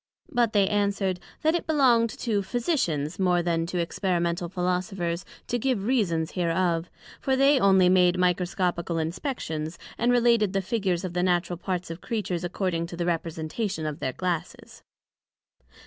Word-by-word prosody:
But 240 Hz, -5 st, +2 dB
they 200 Hz, -2 st, +4 dB
answered, 200 Hz, -2 st, 0 dB, 0.2 s
That 315 Hz, +1 st, +4 dB
it 345 Hz, -, -2 dB
belonged 250 Hz, -7 st, +4 dB
to 220 Hz, -3 st, -1 dB
Physicians 190 Hz, -, -1 dB
more 180 Hz, -2 st, +2 dB
then 165 Hz, -1 st, 0 dB
to 180 Hz, -, -3 dB
Experimental 175 Hz, 0 st, -1 dB
Philosophers, 180 Hz, -1 st, -2 dB, 0.2 s
to 245 Hz, -, -1 dB
give 245 Hz, -5 st, 0 dB
Reasons 180 Hz, -10 st, +1 dB
hereof; 170 Hz, -1 st, 0 dB, 0.3 s
for 265 Hz, -, +1 dB
they 275 Hz, +1 st, +5 dB
only 190 Hz, -3 st, +5 dB
made 180 Hz, -1 st, +4 dB
Microscopical 180 Hz, -1 st, 0 dB
inspections, 165 Hz, -, -3 dB, 0.2 s
and 240 Hz, +1 st, +3 dB
related 235 Hz, -4 st, +3 dB
the 195 Hz, -, +1 dB
Figures 190 Hz, -4 st, -1 dB
of 180 Hz, -, -5 dB
the 180 Hz, -, 0 dB
Natural 175 Hz, -1 st, +1 dB
parts 180 Hz, -1 st, -3 dB
of 165 Hz, -, -8 dB
Creatures 185 Hz, -6 st, -2 dB
acording 175 Hz, -2 st, -1 dB
to 170 Hz, -, -8 dB
the 175 Hz, -, -1 dB
representation 165 Hz, +2 st, -2 dB
of 150 Hz, 0 st, -4 dB
their 130 Hz, -5 st, -2 dB
glasses. 175 Hz, -2 st, -4 dB
180 Hz, 150 wpm, -26 LUFS, 170-210 Hz, 0.3 s, they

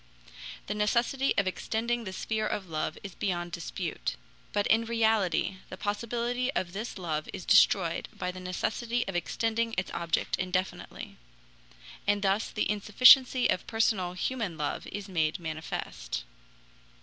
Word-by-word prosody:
The -, -, -2 dB
necessity 235 Hz, +6 st, +1 dB
of 200 Hz, -, +3 dB
extending 230 Hz, +5 st, -1 dB
the 190 Hz, -, -4 dB
sphere 215 Hz, +3 st, -1 dB
of 195 Hz, -3 st, -3 dB
love 155 Hz, -1 st, -2 dB
is 195 Hz, -2 st, -7 dB
beyond 175 Hz, -3 st, -2 dB
dispute. 165 Hz, -, -3 dB, 0.4 s
But 205 Hz, -, +1 dB
in 225 Hz, +1 st, +4 dB
reality 220 Hz, -5 st, +1 dB
the 185 Hz, -, -7 dB
possibility 235 Hz, +5 st, -1 dB
of 175 Hz, -1 st, -2 dB
this 215 Hz, +3 st, -5 dB
love 155 Hz, -4 st, -3 dB
is -, -, -6 dB
destroyed 175 Hz, -5 st, +4 dB
by 180 Hz, -1 st, -3 dB
the 185 Hz, -, -9 dB
necessity 225 Hz, +6 st, -2 dB
of 195 Hz, -, -4 dB
extending 225 Hz, +6 st, 0 dB
its 180 Hz, -, -1 dB
object 170 Hz, -2 st, 0 dB
indefinitely. 185 Hz, +1 st, -3 dB, 0.9 s
And 205 Hz, 0 st, +2 dB
thus 200 Hz, +3 st, +1 dB
the -, -, -1 dB
insufficiency 250 Hz, +5 st, +6 dB
of 185 Hz, -, -1 dB
personal 210 Hz, -5 st, +1 dB
human 200 Hz, -2 st, -2 dB
love 150 Hz, -2 st, -3 dB
is 205 Hz, -1 st, -6 dB
made 160 Hz, -4 st, 0 dB
manifest. 155 Hz, -, -5 dB
200 Hz, 140 wpm, -29 LUFS, 180-225 Hz, 0.9 s, insufficiency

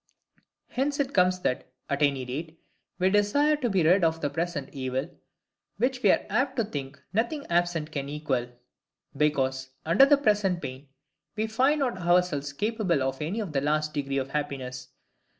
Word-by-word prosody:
Hence 280 Hz, +3 st, -1 dB
it 280 Hz, -1 st, 0 dB
comes 180 Hz, -1 st, +3 dB
that, 125 Hz, -, -1 dB, 0.2 s
at 140 Hz, +1 st, -2 dB
any 140 Hz, -3 st, +2 dB
rate, 155 Hz, +6 st, -6 dB, 0.4 s
we 185 Hz, +1 st, +2 dB
desire 245 Hz, +10 st, +3 dB
to 255 Hz, -5 st, -1 dB
be 190 Hz, -4 st, +2 dB
rid 175 Hz, +4 st, +4 dB
of 165 Hz, 0 st, +2 dB
the 145 Hz, -3 st, -2 dB
present 165 Hz, -3 st, -3 dB
evil, 130 Hz, -1 st, -2 dB, 0.7 s
which 250 Hz, +3 st, 0 dB
we 205 Hz, -, +4 dB
are -, -, +3 dB
apt 255 Hz, +6 st, 0 dB
to 235 Hz, -, +1 dB
think 145 Hz, -8 st, -6 dB
nothing 235 Hz, +8 st, -1 dB
absent 170 Hz, -2 st, +1 dB
can 140 Hz, -2 st, -4 dB
equal; 145 Hz, -5 st, -1 dB, 0.7 s
because, 135 Hz, -3 st, 0 dB, 0.2 s
under 170 Hz, +12 st, +6 dB
the 290 Hz, 0 st, +6 dB
present 205 Hz, -8 st, +2 dB
pain, 135 Hz, -1 st, -7 dB, 0.5 s
we 215 Hz, -, 0 dB
find 265 Hz, +7 st, +2 dB
not 245 Hz, -8 st, -1 dB
ourselves 175 Hz, -5 st, +2 dB
capable 200 Hz, -, 0 dB
of 135 Hz, +2 st, -2 dB
any 185 Hz, +9 st, -2 dB
the 150 Hz, -8 st, -2 dB
least 150 Hz, +1 st, 0 dB
degree 140 Hz, -1 st, -2 dB
of 135 Hz, 0 st, -2 dB
happiness. 130 Hz, -4 st, -4 dB
165 Hz, 170 wpm, -27 LUFS, 140-210 Hz, 0.7 s, under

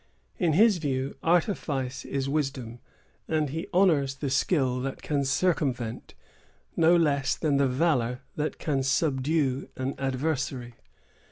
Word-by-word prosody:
In 170 Hz, -6 st, +2 dB
his 210 Hz, +3 st, +5 dB
view, 135 Hz, -3 st, -2 dB
artifice 150 Hz, -, 0 dB
is 135 Hz, -1 st, -2 dB
wisdom; 135 Hz, -5 st, -2 dB, 0.5 s
and 155 Hz, -3 st, 0 dB
he 165 Hz, +5 st, -4 dB
honors 160 Hz, -8 st, +3 dB
the 135 Hz, 0 st, -3 dB
skill 130 Hz, -2 st, +1 dB
that 135 Hz, +1 st, -5 dB
can 145 Hz, -2 st, 0 dB
circumvent, 135 Hz, -6 st, -1 dB, 0.6 s
no 165 Hz, +2 st, +5 dB
less 145 Hz, -5 st, +2 dB
than 150 Hz, -4 st, +1 dB
the 140 Hz, -1 st, +3 dB
valor 125 Hz, -3 st, +1 dB
that 150 Hz, 0 st, -2 dB
can 140 Hz, -4 st, -1 dB
subdue, 135 Hz, 0 st, 0 dB
an 130 Hz, +1 st, -2 dB
adversary. 130 Hz, -2 st, -2 dB
140 Hz, 125 wpm, -27 LUFS, 130-160 Hz, 0.6 s, his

